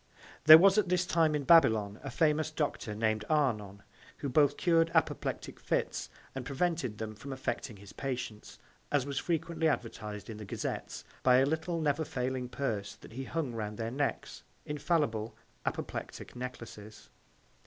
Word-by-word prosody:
* - - -21
There 155 +1 +13
was 195 +4 +6
at 195 -4 0
this 180 0 +2
Time 160 -3 +2
in 145 - -1
Babylon, 110 -10 +5
a 135 - -4
famous 155 +2 +2
Doctor, 145 -8 -2
nam'd 110 0 0
Arnon, 105 -10 0 0.3
who 140 - -3
both 145 +2 +3
cur'd 165 -2 +3
Apoplectic - - -1
Fits, - - -2 0.2
and 135 - -5
prevented 140 -4 -1
them 110 0 -5
from 130 +6 -9
affecting 130 -4 -4
his 100 0 -13
Patients, 125 -5 -5 0.3
as 145 -3 +2
was 140 -1 -2
frequently 165 -1 -1
advertiz'd 105 -7 -3
in 110 -3 -7
the 105 - -7
Gazettes, - - -4 0.2
by 125 -1 +5
a 135 - +5
little 160 +3 -1
never 155 0 +1
failing 130 -2 -3
Purse 115 -6 -3
that - - -14
he 130 +2 -5
hung 155 -6 -2
round 105 -2 -4
their 115 0 -3
Necks. 140 +2 -2
135 Hz, 150 wpm, -31 LUFS, 110-160 Hz, 0.3 s, There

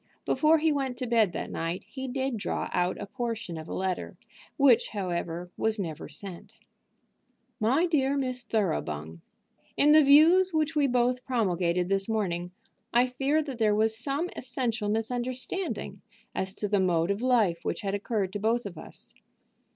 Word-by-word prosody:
Before 315 +1 +4
he 320 0 +2
went 270 -4 -2
to 255 - -3
bed 225 -5 +3
that - - -4
night 165 +2 -3
he 265 0 -7
did 265 0 -2
draw 210 - -3
out 180 0 +1
a - - -4
portion 225 -5 -4
of 160 0 -7
a - - -6
letter, 185 -1 -3 0.4
which, 275 -5 +5
however, 175 -3 -3
was 220 0 +1
never 165 -7 -5
sent: 195 -5 -7 1.0
"MY 260 +11 +3
DEAR 280 -5 +1
MISS 255 -2 -1
THOROUGHBUNG, 80 - -2 0.6
In 295 - +5
the 310 0 +7
views 325 +6 +6
which 315 0 +1
we 290 -2 +3
both 250 0 +1
promulgated 180 -8 0
this 195 +2 0
morning 180 -5 -1 0.4
I 240 +1 +4
fear 270 +5 0
that 270 -5 -7
there 210 -2 +3
was 220 +1 +2
some 280 +8 -2
essential 240 -4 -2
misunderstanding 250 - -3 0.3
as 190 +1 -3
to 205 - -2
the 205 0 +1
mode 175 -1 +2
of 200 +3 -2
life 225 -9 +2
which - - -3
had 195 -1 -2
occurred 200 -2 -2
to 205 - -3
both 230 +3 +1
of 175 -5 -7
us. - - -13
225 Hz, 165 wpm, -28 LUFS, 190-265 Hz, 1.0 s, the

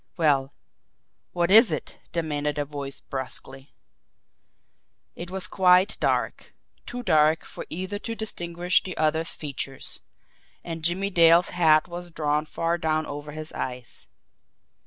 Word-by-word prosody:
"Well, 140 -5 +2 0.8
what 175 0 0
is 220 -1 +8
it?" 155 - -5
demanded 150 -3 -2
a 145 - -1
voice 140 -1 -5
brusquely. 135 +1 -4 1.4
It 170 +1 -7
was 190 0 0
quite 185 0 +4
dark, - - -1 0.3
too 245 0 -6
dark 155 -3 +3
for - - -9
either 185 +5 -4
to 230 +2 -5
distinguish 175 -5 0
the 185 - -7
other's 160 +1 +2
features 140 -2 -5 0.6
and 165 -2 -6
Jimmie 190 +4 0
Dale's 170 0 +5
hat 160 -3 +4
was 175 0 -7
drawn 150 -2 -1
far 165 +2 -1
down 155 -1 0
over 145 +1 -7
his 155 +1 -7
eyes. 125 -1 -6
160 Hz, 130 wpm, -25 LUFS, 150-175 Hz, 1.4 s, is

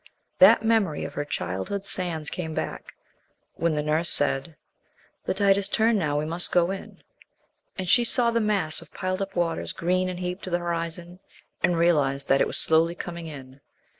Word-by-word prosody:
That - - +7
memory 215 -9 +1
of - - -7
her 145 - -3
childhood 95 - -4
sands 165 -6 -3
came 160 -3 -5
back, - - -5 0.6
when 165 -1 -1
the 150 - -1
nurse 155 +3 +1
said, 145 +3 +1 0.7
"The - - -1
tide 195 0 +4
has 200 0 -1
turned 220 +1 +2
now; 150 -4 -1
we 150 - -1
must 170 +3 0
go 175 0 +3
in," 195 - -9 0.7
and 185 -1 -4
she 240 +6 +5
saw 235 0 +3
the 230 0 +1
mass 200 -7 +2
of - - -14
piled 185 +1 -2
up 195 - -5
waters, 170 -2 -1
green 185 +2 0
and 180 -1 -5
heaped 180 +2 -4
to - - -5
the 175 - +1
horizon, 170 +1 -4 0.4
and 175 -1 +2
realized 145 -5 +1
that 135 - +4
it - - +3
was - - -2
slowly 165 +2 +3
coming 170 -1 -7
in. 135 -3 -11
170 Hz, 190 wpm, -25 LUFS, 155-190 Hz, 0.7 s, That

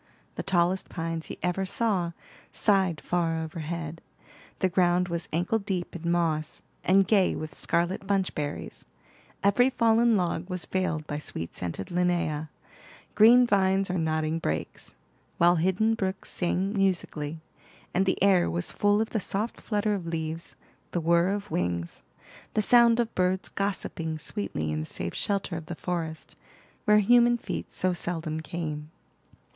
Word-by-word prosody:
The - - -4
tallest 185 0 +1
pines 165 -1 -3
he - - -7
ever 180 +2 0
saw 190 -4 0 0.4
sighed 190 -6 +2
far 165 -2 0
overhead; 160 0 -5 0.6
the 190 - +2
ground 180 0 +2
was 170 0 -3
ankle 180 +7 +1
deep 190 -4 -3
in 170 0 -3
moss, 160 -3 0 0.2
and 190 +1 +4
gay 195 -3 +3
with 155 -1 -6
scarlet 175 +6 -1
bunch 195 -2 +1
berries; 145 -1 -5 0.6
every 225 +6 +4
fallen 230 -2 +3
log 175 0 -1
was 180 -2 -4
veiled 165 -5 -1
by 145 -1 -4
sweet 85 - -5
scented 90 +1 -4
Linnea, 175 -4 0 0.6
green 240 +3 +7
vines 195 -3 +2
or 180 - 0
nodding 160 0 0
brakes; 80 - -4 0.4
while 175 +1 +5
hidden 190 +6 +2
brooks 190 -3 -3
sang 185 +2 -1
musically, 170 -6 0 0.5
and 190 +2 +2
the 185 - +2
air 190 - +4
was 85 +1 -1
full 205 +1 +2
of 225 - -2
the 220 - 0
soft 205 +4 -3
flutter 210 -1 0
of 185 -4 -4
leaves, 165 0 -4 0.4
the 175 - +1
whir 170 +1 +3
of 200 0 -3
wings, 85 -1 -2 0.5
the 215 - +3
sound 235 +1 +6
of 235 -1 0
birds 185 +1 +1
gossiping 180 -5 -2
sweetly 150 - -3
in 75 - -1
the 75 - -3
safe - - -4
shelter 195 -4 -1
of 160 -1 -8
the 175 - -5
forest, 165 -2 -4 0.5
where 210 -2 +6
human 240 +3 +5
feet - - -5
so 185 0 0
seldom 165 -3 -2
came. 155 -2 -5
180 Hz, 150 wpm, -27 LUFS, 160-195 Hz, 0.6 s, green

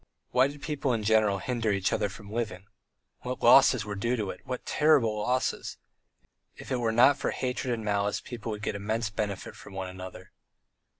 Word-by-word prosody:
Why 130 +2 +4
did 145 0 -10
people 145 -4 -1
in 110 -2 -1
general 105 -2 +3
hinder 115 +1 -1
each 100 -1 0
other 105 -2 0
from 100 +1 -11
living? 110 -5 -3 0.5
What 125 0 -5
losses 125 -2 +6
were 105 - -4
due 115 +5 0
to 105 -5 -2
it! - - -11
what 125 -1 -5
terrible 140 -9 +3
losses! 125 +4 -1 0.8
If - - -11
it 130 - +1
were 115 -2 0
not 125 +5 +5
for - - -1
hatred 125 0 -2
and 115 -2 -3
malice 100 0 0
people 115 -2 -6
would 105 0 -6
get - - -1
immense 110 +2 -2
benefit 100 -2 -4
from 95 - -12
one 95 -1 -4
another. 95 0 -10
110 Hz, 190 wpm, -28 LUFS, 100-125 Hz, 0.8 s, losses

